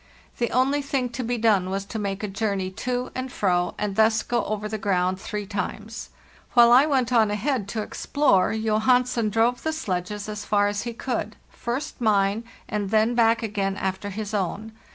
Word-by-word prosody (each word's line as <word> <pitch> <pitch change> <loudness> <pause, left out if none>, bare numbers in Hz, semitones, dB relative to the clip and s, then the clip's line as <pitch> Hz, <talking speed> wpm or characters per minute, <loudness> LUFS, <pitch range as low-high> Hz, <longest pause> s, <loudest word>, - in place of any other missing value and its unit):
The 235 -2 +1
only 270 +4 +2
thing 275 -3 -1
to 240 +2 -4
be 240 +1 -1
done 210 -5 +2
was 195 +1 -2
to 220 +2 -5
make 200 0 -3
a - - 0
journey 195 -2 -2
to 250 +5 -3
and 255 0 -4
fro, 180 -6 0
and 205 -2 -2
thus 220 +1 +3
go 240 -1 0
over 210 0 -3
the 215 0 -4
ground 185 -1 0
three 210 -1 -4
times. 210 +3 -5 0.4
While 240 -1 +7
I 260 +5 +7
went 255 -4 +1
on 220 -3 +4
ahead 210 +1 -1
to 215 +1 -3
explore, 245 -6 +2
Johansen 225 +2 +2
drove 230 +3 +1
the 315 - -1
sledges 205 - -3
as 210 0 -5
far 205 -1 +2
as 205 0 -2
he - - -6
could; 245 +1 -3 0.2
first 245 +3 -4
mine, 205 0 +2 0.2
and 205 -2 -2
then 220 +2 +3
back 230 0 +3
again 200 -2 -1
after 190 +1 -3
his 210 +1 -5
own. 205 +3 -2
215 Hz, 190 wpm, -24 LUFS, 200-240 Hz, 0.4 s, While